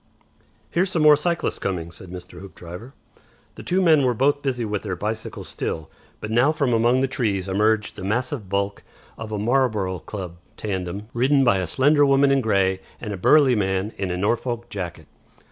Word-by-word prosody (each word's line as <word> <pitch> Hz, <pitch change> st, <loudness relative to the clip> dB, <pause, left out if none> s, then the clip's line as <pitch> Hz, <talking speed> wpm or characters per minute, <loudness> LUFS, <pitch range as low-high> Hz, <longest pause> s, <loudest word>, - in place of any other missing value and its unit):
"Here's 180 Hz, +2 st, +1 dB
some 165 Hz, -4 st, 0 dB
more 150 Hz, -1 st, +8 dB
cyclists 170 Hz, +3 st, -1 dB
coming," 85 Hz, -4 st, -3 dB
said 90 Hz, +2 st, -11 dB
Mr. 90 Hz, 0 st, -9 dB
Hoopdriver. 95 Hz, +5 st, -10 dB, 0.6 s
The -, -, -10 dB
two 185 Hz, +1 st, +1 dB
men 160 Hz, -4 st, +5 dB
were 125 Hz, -2 st, +2 dB
both 145 Hz, +4 st, +2 dB
busy 125 Hz, -4 st, -1 dB
with 105 Hz, -2 st, -2 dB
their 95 Hz, -4 st, -4 dB
bicycle 110 Hz, +4 st, -4 dB
still, 80 Hz, -1 st, -5 dB, 0.3 s
but 110 Hz, -, -6 dB
now 120 Hz, +6 st, +4 dB
from 140 Hz, -6 st, 0 dB
among 120 Hz, +3 st, +3 dB
the 135 Hz, -, +2 dB
trees 100 Hz, -7 st, -1 dB
emerged 105 Hz, +2 st, +1 dB
the -, -, -8 dB
massive 115 Hz, +1 st, -2 dB
bulk 100 Hz, +1 st, -1 dB, 0.3 s
of 110 Hz, -1 st, -8 dB
a 105 Hz, -, -2 dB
'Marlborough 105 Hz, -5 st, 0 dB
Club' 90 Hz, -2 st, -7 dB, 0.2 s
tandem, 95 Hz, 0 st, -4 dB
ridden 135 Hz, +3 st, +3 dB
by 115 Hz, -7 st, +3 dB
a 90 Hz, -, -2 dB
slender 145 Hz, -, +3 dB
woman 140 Hz, 0 st, +4 dB
in 135 Hz, -1 st, +3 dB
grey 95 Hz, -4 st, +1 dB, 0.2 s
and 105 Hz, -2 st, -5 dB
a -, -, -3 dB
burly 135 Hz, +7 st, +5 dB
man 95 Hz, -1 st, -1 dB
in 95 Hz, -, -3 dB
a 90 Hz, -, -2 dB
Norfolk 120 Hz, +4 st, -1 dB
jacket. 90 Hz, -5 st, -6 dB
110 Hz, 185 wpm, -23 LUFS, 95-135 Hz, 0.6 s, more